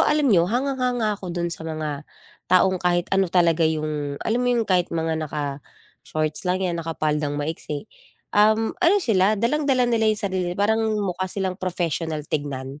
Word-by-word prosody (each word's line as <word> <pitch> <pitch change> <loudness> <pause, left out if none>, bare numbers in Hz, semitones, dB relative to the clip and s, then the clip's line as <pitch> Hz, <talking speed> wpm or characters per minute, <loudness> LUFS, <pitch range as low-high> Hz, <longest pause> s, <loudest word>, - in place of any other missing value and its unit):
alam 300 -1 +3
niyo, 175 -1 +4
hangang-hanga 250 -3 0
ako 195 -2 -7
do'n 170 -1 -2
sa - - -8
mga 150 -2 -4 0.4
taong 185 0 +4
kahit 175 -1 +1
ano 195 -1 +3
talaga 170 -2 +3
'yong 150 -2 -2
alam 230 +2 +1
mo 250 - +1
'yong 240 -2 +2
kahit 180 -3 +1
mga 165 -1 -1
naka-shorts 150 +2 -5
lang 185 +1 +1
'yan, 170 -2 -1
nakapaldang 150 -2 -1
maiksi, 150 -1 -4 0.5
um, 215 +2 +3
ano 360 +3 +5
sila, 215 - +2
dalang-dala 260 +3 +2
nila 230 -2 +2
'yong 215 -1 0
sarili. 185 -2 -1
Parang 220 +2 +2 0.2
mukha 185 0 -2
silang 190 0 -3
professional 165 -4 -2
tignan. 140 -2 -4
180 Hz, 160 wpm, -23 LUFS, 155-215 Hz, 0.5 s, ano